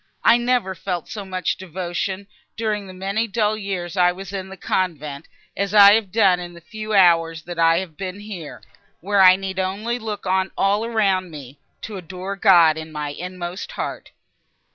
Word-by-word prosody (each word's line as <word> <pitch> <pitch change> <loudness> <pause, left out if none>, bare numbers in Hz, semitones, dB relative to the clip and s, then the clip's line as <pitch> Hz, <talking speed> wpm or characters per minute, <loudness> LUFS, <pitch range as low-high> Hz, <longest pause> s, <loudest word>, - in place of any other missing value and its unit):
I 235 - +6
never 240 -5 0
felt 175 -1 -4
so 210 - -6
much 185 -1 -2
devotion, 185 +2 -4 0.3
during 210 -3 -2
the - - -9
many 195 +5 -2
dull 215 0 0
years 190 -4 -4
I 180 -1 +4
was 190 +1 -9
in 190 -1 -5
the 195 - -10
convent, 155 -6 -2 0.3
as 200 +1 -2
I 200 -1 +9
have 215 -4 +1
done 195 -4 +4
in 175 -1 -8
the - - -11
few 215 +4 -5
hours, 165 -3 +4
that 175 0 -7
I 165 0 +5
have 170 -4 -5
been 195 +1 -6
here, 195 -7 -8 0.4
where 200 +3 +2
I 185 -1 +8
need 190 0 -5
only 210 +6 -2
look 215 -3 -6
on 190 0 +1
all 200 +2 +2
around 200 -5 +1
me—to 145 - -10
adore 185 +2 -6
God 175 -6 +5
in 160 0 -8
my 150 -1 -4
inmost 180 +3 -6
heart!" - - -5
190 Hz, 180 wpm, -22 LUFS, 175-200 Hz, 0.4 s, I